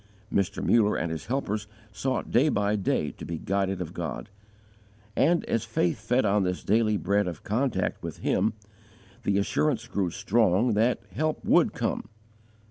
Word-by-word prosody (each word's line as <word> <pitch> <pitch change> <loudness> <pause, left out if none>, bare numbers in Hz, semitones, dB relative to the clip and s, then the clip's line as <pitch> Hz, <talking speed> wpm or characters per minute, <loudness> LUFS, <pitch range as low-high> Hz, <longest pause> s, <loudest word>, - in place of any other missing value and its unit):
Mr. 100 -3 0
Muller 105 -3 +4
and 80 +1 -1
his 80 +5 -5
helpers 105 -5 -2 0.2
sought 125 +6 -2
day 135 +6 +4
by 105 -4 +1
day 100 - 0
to - - -12
be 85 - -4
guided 95 +1 -1
of 85 -1 -5
God, 85 -6 -5 0.9
and, 170 +3 +3
as 115 - 0
faith 110 -7 0
fed 120 +3 +1
on 105 0 +3
this 90 -1 -1
daily 110 0 +2
bread 100 0 +1
of 85 -4 -6
contact 125 +5 -1
with - - -6
Him, - - +1 0.7
the 100 - +1
assurance 115 +4 0
grew 95 -3 -1
strong 105 +3 +2
that 115 +4 +2
help 155 0 -1
would - - +4
come. - - -2
105 Hz, 160 wpm, -27 LUFS, 95-115 Hz, 0.9 s, Muller